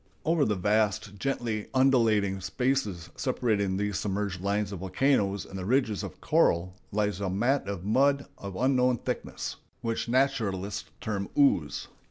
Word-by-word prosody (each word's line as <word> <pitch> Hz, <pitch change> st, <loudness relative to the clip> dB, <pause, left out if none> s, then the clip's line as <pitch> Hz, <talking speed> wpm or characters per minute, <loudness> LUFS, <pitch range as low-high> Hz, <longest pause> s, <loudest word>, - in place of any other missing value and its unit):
Over 160 Hz, -3 st, +3 dB
the 105 Hz, -, +1 dB
vast, 105 Hz, +1 st, 0 dB
gently 115 Hz, -4 st, -2 dB
undulating 110 Hz, -7 st, +3 dB
spaces 105 Hz, -7 st, -1 dB
separating 105 Hz, -7 st, 0 dB
these 105 Hz, -1 st, -1 dB
submerged 100 Hz, -2 st, -2 dB
lines 100 Hz, +1 st, 0 dB
of 100 Hz, -, -5 dB
volcanoes 100 Hz, 0 st, +1 dB
and 95 Hz, -, -7 dB
the -, -, -4 dB
ridges 120 Hz, -4 st, +2 dB
of -, -, -7 dB
coral, 85 Hz, +2 st, +2 dB, 0.2 s
lies 105 Hz, -2 st, 0 dB
a 95 Hz, -, 0 dB
mat 120 Hz, +6 st, +1 dB
of 100 Hz, -3 st, -4 dB
mud 140 Hz, +6 st, +3 dB
of 100 Hz, -1 st, -8 dB
unknown 125 Hz, +1 st, +3 dB
thickness, -, -, -4 dB, 0.2 s
which 115 Hz, 0 st, -2 dB
naturalists 115 Hz, -7 st, 0 dB
term 100 Hz, -3 st, -3 dB
"ooze." 135 Hz, -, +2 dB
105 Hz, 145 wpm, -28 LUFS, 95-130 Hz, 0.2 s, Over